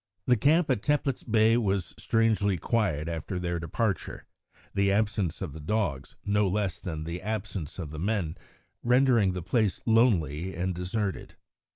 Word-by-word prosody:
The 125 - +4
camp 150 +6 +3
at 125 - +1
Teplitz 145 -2 0
Bay 110 0 +3
was 100 -6 0
strangely 110 -4 +1
quiet 85 -6 0
after 85 +2 -4
their 85 -1 -2
departure, 95 +5 -2 0.5
the 100 0 +2
absence 100 -5 0
of 70 - -5
the 80 - -8
dogs, 75 -6 -2
no 105 0 +2
less 100 0 -1
than 80 -4 -5
the 85 +2 -5
absence 100 -6 -4
of 80 -6 -5
the 75 - -6
men, 95 -4 -1 0.5
rendering 120 -5 +4
the 90 -2 -4
place 105 +2 +1
lonely 95 - +2
and 90 +1 -1
deserted. 95 +3 -3
100 Hz, 155 wpm, -28 LUFS, 85-110 Hz, 0.5 s, The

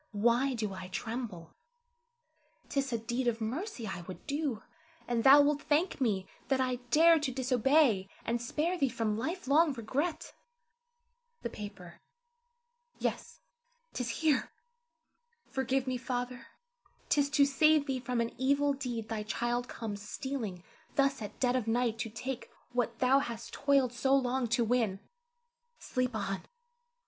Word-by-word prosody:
Why 240 +5 +2
do 215 -4 -2
I 190 -1 -7
tremble? 210 -4 -5 1.2
'T 280 - 0
is 270 -1 -1
a 235 - +1
deed 240 +3 -2
of 230 -1 +1
mercy 255 - -3
I 185 -4 -4
would 185 - -9
do, 285 -6 -2 0.4
and 235 -2 0
thou 280 +2 +9
wilt 290 0 +2
thank 310 +1 +1
me 200 -6 +1 0.2
that 270 -1 +2
I 255 -1 +1
dared 325 +3 +6
to 280 -3 -1
disobey, 255 -4 +3 0.2
and 235 0 0
spare 320 +9 -1
thee 275 - +3
from 225 -3 -1
life 325 - -3
long 300 +2 +4
regret. 265 +8 -2 1.1
The 235 - -3
paper, 200 -5 -9 1.0
yes, - - -3 0.5
'tis 250 -2 -2
here! 300 +2 +1 0.9
Forgive 265 0 -1
me, 255 -1 -1
Father; 245 0 -4 0.6
'tis 285 -1 +3
to 285 -1 +5
save 305 +1 +4
thee 265 -2 -1
from 250 -1 -1
an 230 - -2
evil 280 +2 +3
deed 245 -5 -4
thy 220 -1 -3
child 240 +3 -1
comes 210 -5 -5
stealing 210 -5 -4 0.3
thus 275 -3 +2
at 210 -1 -7
dead 250 -1 +2
of 245 -3 -1
night 230 0 +1
to 225 - -2
take 240 +4 -5 0.2
what 240 -2 -1
thou 260 +3 +4
hast 235 -3 -5
toiled 275 -3 +2
so 265 +2 +3
long 255 -1 +1
to 235 +1 +2
win. 220 -5 +1 0.8
Sleep 255 -2 -2
on! 195 -2 -3
250 Hz, 150 wpm, -31 LUFS, 225-275 Hz, 1.2 s, thou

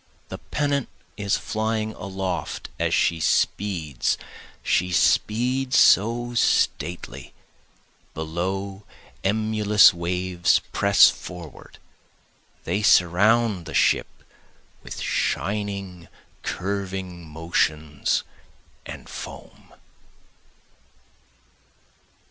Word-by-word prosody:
The - - -7
pennant 145 -2 -1 0.3
is 100 -1 0
flying 110 0 -2
aloft 95 -2 -4
as - - 0
she 85 - +2
speeds 80 -5 0 0.5
she 90 +1 +1
speeds 125 +8 +2
so 120 +4 +4
stately 90 -6 -1 0.8
below 95 +5 -4 0.4
emulous 105 0 +4
waves 90 +1 +1
press 100 0 +6
forward, 90 -4 -11 0.9
They 95 +5 -1
surround 105 0 +3
the 80 - -6
ship - - +3 0.7
with - - -8
shining 100 -3 -2 0.3
curving 95 -2 -4
motions 80 -1 -1 0.6
and - - -9
foam. - - -10
95 Hz, 75 wpm, -24 LUFS, 85-110 Hz, 0.9 s, press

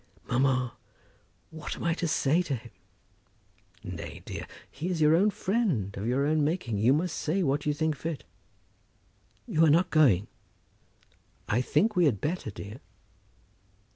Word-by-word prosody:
"Mamma, 130 -1 +1 0.8
what 160 -1 -6
am - - -7
I 170 -1 +2
to 170 +1 -2
say 155 +2 +2
to 150 -6 -2
him?" 115 -1 -10 1.1
"Nay, - - -7
dear; - - -6 0.2
he 175 - -4
is 175 -3 -1
your 155 +1 +5
own 200 +5 +4
friend, 185 - -1
of 100 +3 -4
your 130 +3 +1
own 155 0 +2
making. 145 - -1
You 115 +5 +4
must 160 +4 +1
say 180 +5 0
what 145 0 0
you 150 - +2
think 155 0 0
fit." 155 +1 -5 1.2
"You 160 - +2
are 160 - +6
not 170 +4 +3
going?" 125 - +4 1.2
"I 115 +4 +2
think 195 - +1
we 180 - +4
had 120 -10 +2
better, 160 - -2
dear." 105 +3 -9
150 Hz, 155 wpm, -28 LUFS, 125-170 Hz, 1.2 s, are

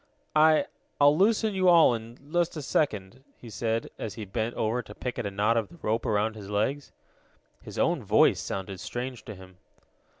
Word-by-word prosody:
"I 155 0 +5 0.3
I'll 145 +1 +6
loosen 215 +4 +2
you 185 -1 +3
all 170 -7 +6
in 115 +1 -7 0.2
just 175 -1 +1
a 150 - -5
second," 120 -4 -1
he 115 - -12
said, 115 +2 -2
as 110 - -5
he 110 - -6
bent 110 +4 -3
over 115 +3 0
to 105 -2 -13
pick 125 -1 -5
at 120 - -3
the - - -1
knot 105 +4 +1
of 110 -3 -1
the 170 - -15
rope 110 +2 -1
around 110 +1 +1
his 100 -2 -9
legs. 120 +8 -1 0.7
His - - -10
own - - +1
voice - - +4
sounded 95 -1 -5
strange 125 -2 -5
to 110 - -8
him. 95 -1 -15
115 Hz, 195 wpm, -27 LUFS, 105-145 Hz, 0.7 s, I'll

